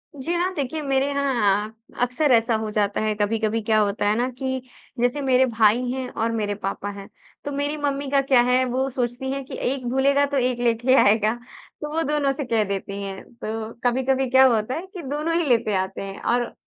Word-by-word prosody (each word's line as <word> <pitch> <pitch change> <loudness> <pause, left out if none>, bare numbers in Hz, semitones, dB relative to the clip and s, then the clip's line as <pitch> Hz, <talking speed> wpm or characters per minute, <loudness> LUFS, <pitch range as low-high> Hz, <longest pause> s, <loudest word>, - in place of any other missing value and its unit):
जी 285 +5 -3
हाँ। 355 +2 0
देखिए 295 +2 -3
मेरे 275 -1 +1
यहाँ 235 -8 +1 0.3
अक्सर 250 +4 +1
ऐसा 230 0 +3
हो 220 0 -2
जाता 205 -1 0
है, 215 0 0
कभी-कभी 220 +1 0
क्या 215 0 +2
होता 205 0 0
है 210 - +2
ना 245 - +1
कि 260 -1 -2 0.4
जैसे 245 +4 +1
मेरे 260 -1 +4
भाई 230 -1 +3
हैं 260 0 -3
और 230 0 -2
मेरे 210 -2 -1
पापा 200 0 -4
हैं, 200 -1 -10 0.4
तो 290 - -3
मेरी 285 +2 -2
मम्मी 285 -1 -2
का 275 - +4
क्या 265 -2 +4
है 250 +1 +3
वो 255 +2 -1
सोचती 250 +1 -3
हैं 275 0 -3
कि - - -8 0.2
एक 265 -2 -4
भूलेगा 275 +2 +3
तो 280 0 -2
एक 250 -1 0
लेके 240 +2 +2
आएगा 215 +1 +3 0.5
तो 300 - -4
वो 325 - +1
दोनों 295 -2 +1
से 280 +1 -4
कह 230 -3 +1
देती 200 0 -4
हैं। 195 -1 -6
तो 225 -1 -5
कभी-कभी 260 +1 +1
क्या 260 +1 +6
होता 220 +3 -1
है 335 - -5
कि 360 - -6
दोनों 300 +4 -2
ही 340 - +1
लेते 230 -3 +2
आते 190 0 -2
हैं 195 0 -7
और 240 0 0
245 Hz, 210 wpm, -23 LUFS, 220-275 Hz, 0.5 s, क्या